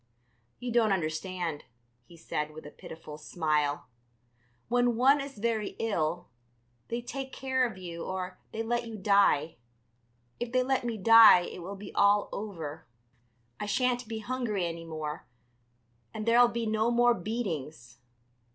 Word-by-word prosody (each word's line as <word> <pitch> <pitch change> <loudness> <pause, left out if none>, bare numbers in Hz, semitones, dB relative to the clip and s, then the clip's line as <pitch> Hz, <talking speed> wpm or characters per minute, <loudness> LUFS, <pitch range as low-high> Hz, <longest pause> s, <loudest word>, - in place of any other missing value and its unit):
"You 245 -1 -5
don't 225 -3 +3
understand," 170 -2 -2 0.4
he 170 - -16
said, 150 -2 -4
with 155 - -10
a 150 - -9
pitiful 155 -2 -10
smile. 150 -3 -1 0.8
"When 245 0 +2
one 270 +4 +4
is 275 -3 -8
very 220 -1 -1
ill, 175 -7 -1 0.6
they 235 +1 -3
take 265 +2 -6
care 260 -2 0
of 215 - -11
you 170 -2 -7
or 185 0 -5
they 225 - -3
let 240 +1 -1
you 225 -1 -7
die. 195 - +3 0.8
If 240 -1 -4
they 255 0 +3
let 265 0 0
me 230 -2 -2
die 225 -2 +8
it 175 - -7
will 195 +4 -6
be 200 0 -10
all 205 0 +3
over, 160 - -6 0.7
I 210 - -4
shan't 245 +1 0
be 225 0 -4
hungry 220 -4 -2
any 165 0 -5
more, 155 -1 -6 0.9
and 215 - -4
there'll 240 +1 +6
be 235 -1 -3
no 220 +1 +1
more 240 0 +4
beatings. 160 - -5
205 Hz, 150 wpm, -29 LUFS, 165-235 Hz, 0.9 s, die